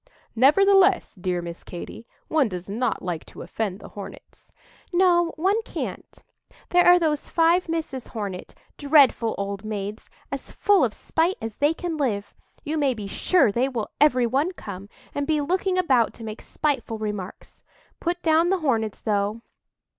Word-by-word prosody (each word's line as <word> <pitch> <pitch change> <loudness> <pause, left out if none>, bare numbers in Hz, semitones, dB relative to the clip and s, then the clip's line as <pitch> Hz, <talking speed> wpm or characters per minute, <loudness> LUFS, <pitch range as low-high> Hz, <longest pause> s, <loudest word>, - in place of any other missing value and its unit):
"Nevertheless, 390 - +4
dear 180 -2 -3
Miss 170 0 -8
Katy, 180 +6 -9 0.2
one 295 -7 +2
does 180 -2 -6
not 225 +4 -2
like 175 -3 -3
to - - -10
offend 195 +2 -3
the - - -11
Hornets." 200 -2 -11 0.4
"No, 345 -2 +3
one 385 +7 +1
can't. - - -7 0.5
There 355 0 +5
are 355 0 +8
those 310 -4 -1
five 335 +1 +3
Misses 310 -7 -3
Hornet—dreadful 230 +5 +1
old 200 0 -4
maids!—as 210 0 -7
full 410 -2 +3
of - - 0
spite 335 +4 0
as 225 -2 -6
they 295 +3 +2
can 340 -2 -4
live. 215 -9 -2 0.3
You 310 0 -2
may 275 -4 +2
be 210 -2 -6
sure 230 - +2
they 245 +6 +1
will 235 -5 -4
every 255 -5 +5
one 275 +10 0
come, 200 - -9 0.2
and 285 0 -2
be 310 -1 +2
looking 365 +5 0
about 260 -10 +2
to 230 - -10
make 215 0 -7
spiteful 270 -7 -2
remarks. 210 -3 -6 0.4
Put 350 +1 -2
down 325 +1 +3
the 385 - +2
Hornets, 225 -8 0
though." 210 +1 -1
265 Hz, 155 wpm, -24 LUFS, 210-330 Hz, 0.5 s, are